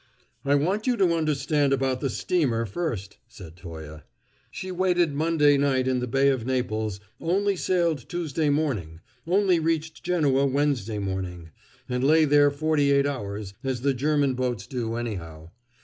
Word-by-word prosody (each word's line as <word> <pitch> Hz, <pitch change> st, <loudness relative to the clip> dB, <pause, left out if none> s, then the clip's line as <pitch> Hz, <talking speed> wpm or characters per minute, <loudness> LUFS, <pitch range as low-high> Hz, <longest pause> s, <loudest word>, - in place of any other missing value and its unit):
"I 140 Hz, +1 st, +3 dB
want 190 Hz, -, 0 dB
you 245 Hz, -2 st, +2 dB
to 180 Hz, -4 st, +3 dB
understand 145 Hz, -2 st, +1 dB
about 130 Hz, -1 st, 0 dB
the 135 Hz, -, 0 dB
steamer 130 Hz, -9 st, 0 dB
first," 105 Hz, -, -4 dB
said 95 Hz, -9 st, -12 dB
Toye. 80 Hz, -4 st, -9 dB, 0.5 s
"She 185 Hz, -, -6 dB
waited 180 Hz, -3 st, +1 dB
Monday 150 Hz, -1 st, +3 dB
night 130 Hz, -2 st, +1 dB
in 130 Hz, -1 st, +1 dB
the 125 Hz, -, -3 dB
Bay 135 Hz, +3 st, +3 dB
of 130 Hz, -4 st, 0 dB
Naples, 110 Hz, -5 st, -2 dB, 0.2 s
only 195 Hz, +4 st, +1 dB
sailed 170 Hz, -7 st, 0 dB
Tuesday 160 Hz, -3 st, -1 dB
morning, 115 Hz, -, -1 dB, 0.3 s
only 185 Hz, -1 st, +3 dB
reached 160 Hz, 0 st, -2 dB
Genoa 145 Hz, -6 st, +2 dB
Wednesday 135 Hz, -6 st, 0 dB
morning, 95 Hz, -4 st, -4 dB, 0.4 s
and 125 Hz, 0 st, -2 dB
lay 155 Hz, +3 st, +5 dB
there 145 Hz, 0 st, +5 dB
forty 145 Hz, 0 st, +1 dB
eight 140 Hz, 0 st, +4 dB
hours, 105 Hz, -7 st, -4 dB
as 130 Hz, -3 st, -2 dB
the 140 Hz, +1 st, +2 dB
German 140 Hz, +1 st, +1 dB
boats 125 Hz, -5 st, -2 dB
do, 115 Hz, -2 st, -3 dB
anyhow. 85 Hz, -9 st, -6 dB
140 Hz, 155 wpm, -25 LUFS, 115-160 Hz, 0.5 s, lay